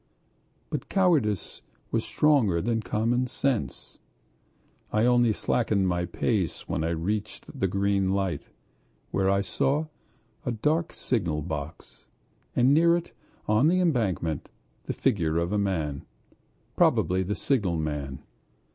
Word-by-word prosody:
But - - -4
cowardice 150 - +1 0.3
was - - +1
stronger 130 - +3
than 115 +4 0
common 115 +4 0
sense. 130 -2 -2 0.9
I 110 +2 +2
only 120 -2 +4
slackened 105 -2 +1
my 90 -1 0
pace 95 +1 -1
when - - -1
I 80 - 0
reached 95 +6 -3
the 95 - +2
green 100 0 +1
light, 95 -2 -1 0.6
where 95 -1 +1
I 100 0 +3
saw 140 +9 0 0.6
a 125 - -1
dark 150 +9 0
signal 85 - -1
box, 75 0 -7 0.5
and 125 +3 +4
near 170 +2 +5
it 175 - -7 0.4
on 110 +7 +4
the 180 +3 +3
embankment 105 - 0 0.4
the - - -2
figure 85 -11 +1
of 85 +2 0
a 105 - +1
man, 80 -8 -1 0.7
probably 95 +1 +3
the 100 +3 -2
signalman. 80 - -1
105 Hz, 125 wpm, -27 LUFS, 85-125 Hz, 0.9 s, near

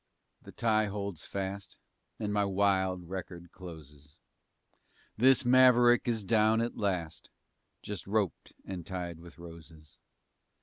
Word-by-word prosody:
the - - -12
tie 110 -2 +1
holds 100 -4 -5
fast 100 -1 -5 0.4
And 105 -1 -3
my 105 0 +2
wild 95 -2 +1
record 90 -1 -7
closes. 75 -5 -12 1.0
This 130 +3 +4
maverick 125 -1 +5
is 115 -3 0
down 110 +1 +3
at 115 +1 -2
last 90 -6 -3 0.5
Just 100 -4 -6
roped 100 -3 -1
and 90 -3 -6
tied 90 -2 -5
with 85 0 -14
roses. 80 -3 -13
95 Hz, 120 wpm, -30 LUFS, 85-110 Hz, 1.0 s, maverick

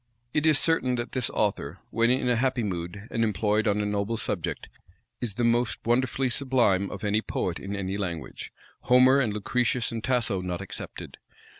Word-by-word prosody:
It 150 +1 +2
is 155 -3 +6
certain 140 -7 +2
that 120 0 -4
this 130 -4 -1
author, 95 -6 -1
when 115 +1 +2
in 125 0 +2
a 125 - +3
happy 125 0 +1
mood, 95 +2 -4
and 115 - 0
employed 105 +1 +1
on 105 0 +2
a - - -1
noble 105 +2 -1
subject, - - -3 0.5
is 115 -5 -3
the 120 - -1
most 120 0 +2
wonderfully 130 +2 +1
sublime 120 -8 +2
of 100 - -8
any 105 +1 +1
poet 90 -5 -3
in 100 +1 -5
any 95 0 -3
language, 85 -6 -5 0.3
Homer, 130 +2 +6
and 125 -6 +1
Lucretius, 120 +4 0
and 115 -1 -4
Tasso 120 -7 +1
not 90 -1 -3
excepted. - - -7
115 Hz, 180 wpm, -27 LUFS, 100-125 Hz, 0.5 s, is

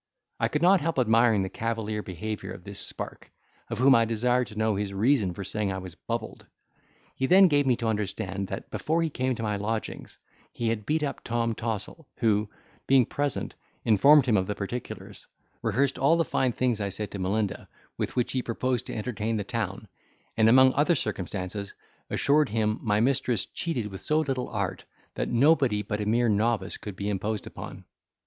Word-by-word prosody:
I - - +2
could 150 +2 -1
not 185 +1 +6
help 165 0 -1
admiring 115 -3 +4
the - - -2
cavalier 110 -2 -3
behaviour 105 +3 -5
of 90 - -11
this 100 0 -5
spark, - - -5 0.4
of - - -3
whom 130 +2 +6
I 115 -2 +5
desired 120 +2 +1
to 105 - -11
know 110 -1 +1
his 100 -1 -3
reason 110 -2 +2
for 100 - -5
saying 100 +1 -2
I 95 - -3
was 95 -2 -7
bubbled. 115 +4 -5 0.7
He 130 - -1
then 190 +3 +7
gave 145 -4 +2
me 125 - +4
to 115 - -3
understand, 100 -2 -2
that - - -7
before 165 +2 0
he 160 - -1
came 130 -1 -1
to 115 - -5
my 105 -2 -1
lodgings, 110 +2 -4 0.3
he 115 -1 -2
had 110 -2 -3
beat 155 +1 +1
up 140 - -3
Tom 115 -1 0
Tossle, 115 +7 -5
who, 105 -3 +2 0.4
being 130 -2 +5
present, 145 +3 -2 0.3
informed 135 +7 +6
him 115 -5 +3
of 95 -1 0
the 105 - -2
particulars, 115 +4 -6 0.3
rehearsed 130 +5 +1
all 150 +5 +4
the 165 - +2
fine 130 -3 +1
things 120 -2 0
I 100 - -1
said 105 +1 -5
to 100 - -5
Melinda, 100 +2 -1 0.3
with - - -3
which 125 - 0
he 130 - 0
proposed 125 +1 -1
to - - -5
entertain 110 0 -2
the 105 - -2
town, 105 -2 -4 0.5
and 110 0 +5
among 130 +2 +7
other 155 +4 +3
circumstances, 100 - -4 0.3
assured 145 0 +2
him 110 0 0
my 105 -2 +1
mistress 120 -3 +1
cheated 160 -10 -3
with 95 - -8
so 155 +1 +1
little 135 -4 -2
art, 100 -4 -3 0.3
that - - -2
nobody 125 -4 +3
but 105 0 -3
a 105 - -2
mere 120 +2 +3
novice 105 -1 +1
could 105 -3 -8
be 100 +2 -4
imposed 105 +1 -2
upon. - - -9
115 Hz, 195 wpm, -27 LUFS, 105-130 Hz, 0.7 s, then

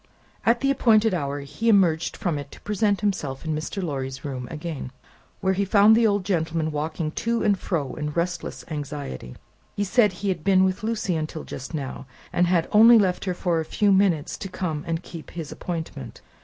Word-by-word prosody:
At 235 +1 +4
the 275 - +3
appointed 225 -5 +4
hour, 145 -4 -2
he 225 +11 -2
emerged 175 -6 +3
from 175 -8 -1
it 145 - -8
to - - -14
present 210 -1 0
himself 165 -10 -2
in 160 - -1
Mr. 160 +5 -4
Lorry's 135 -4 -4
room 130 -3 -4
again, 155 -5 -5 0.5
where 190 0 +2
he 195 +2 0
found 205 +2 +6
the 230 0 +4
old 205 -3 0
gentleman 165 -4 0
walking 155 +1 -2
to 230 +7 -1
and 205 -2 +4
fro 165 -7 -3
in 150 -1 -3
restless 170 +2 -3
anxiety. 140 - -5 0.4
He 205 - 0
said 210 +1 +3
he 195 +3 -3
had 180 -5 -2
been 190 -1 +4
with 185 0 0
Lucie 215 -5 -1
until 155 0 -4
just 135 +5 -7
now, 135 -2 -5 0.3
and 175 0 +3
had 175 -2 +2
only 230 +3 +8
left 190 -4 +1
her 185 -2 -1
for 175 -2 0
a - - -1
few 205 +5 +1
minutes, 190 -6 +2
to 195 - -5
come 160 -5 -3
and 165 +1 -2
keep 165 -2 -9
his 165 -4 -7
appointment. 160 -9 -6
175 Hz, 195 wpm, -24 LUFS, 150-200 Hz, 0.5 s, only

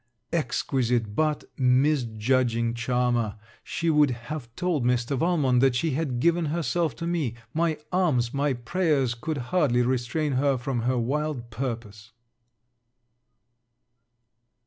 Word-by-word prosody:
_ - - +2
Exquisite, 125 -8 0
but 155 -1 +1 0.2
misjudging 125 -3 +2
charmer! 120 -2 0 0.3
She 165 -1 -1
would 150 -2 +4
have 120 +2 -6
told 175 -7 0
Mr. 125 +2 +1
Valmont, 145 -5 +2
that 135 -2 +4
she 160 +5 0
had 135 -3 -1
given 170 +4 +2
herself 165 0 -1
to 170 - -5
me. 160 -9 -1 0.2
My 165 -1 +1
arms 150 -11 +1
my 140 0 +1
prayers 135 0 0
could 150 +6 -4 0.2
hardly 135 -9 +3
restrain 130 +5 0
her 140 -2 +2
from 125 0 -2
her 130 - +1
wild 130 0 -2
purpose. 110 -3 -5
130 Hz, 125 wpm, -26 LUFS, 120-155 Hz, 0.3 s, would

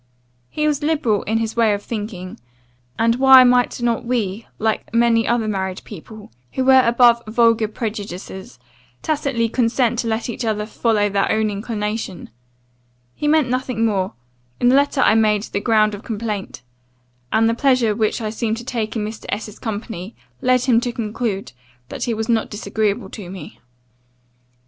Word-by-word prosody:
He 300 - -2
was 295 -1 0
liberal 290 -9 +1
in 220 +2 0
his 225 0 -2
way 225 -3 +3
of 205 - -8
thinking; 205 - -6 0.6
and 230 +1 +2
why 265 0 +8
might 245 0 +3
not 235 -1 0
we, 225 -4 -2
like 220 0 -1
many 230 -1 +3
other 235 -2 +1
married 190 -2 -3
people, 210 +2 -11 0.2
who 260 - 0
were 265 0 +7
above 235 0 +4
vulgar 230 0 +3
prejudices, 200 - -6 0.5
tacitly 280 -6 0
consent 235 0 +1
to 235 - -1
let 225 0 -1
each 240 +1 -4
other 215 -2 -1
follow 215 -1 +1
their 200 -1 0
own 220 -1 +1
inclination? 210 - -4 0.8
He 295 - -3
meant 305 -2 +3
nothing 250 -2 -1
more, 195 -4 0 0.5
in 245 - +4
the 255 - +5
letter 280 -1 +2
I - - +5
made 215 -2 +3
the 200 - -3
ground 215 -1 +2
of 205 - -7
complaint; 210 - -5 0.7
and 225 +1 +3
the 230 - +2
pleasure 250 -3 +2
which 215 +2 -1
I 215 -1 -3
seemed 225 0 -2
to 235 - -8
take 230 -3 -3
in 215 -2 -1
Mr. 220 +1 -7
S.'s 210 0 -5
company, 215 -2 -6 0.3
led 255 0 +3
him 240 -3 +3
to 245 - -2
conclude, 215 -3 -3 0.4
that - - -4
he 235 - -1
was 220 0 -3
not 230 -2 +1
disagreeable 210 +1 -2
to 195 -6 -8
me. 190 0 -10
225 Hz, 170 wpm, -20 LUFS, 210-240 Hz, 0.8 s, why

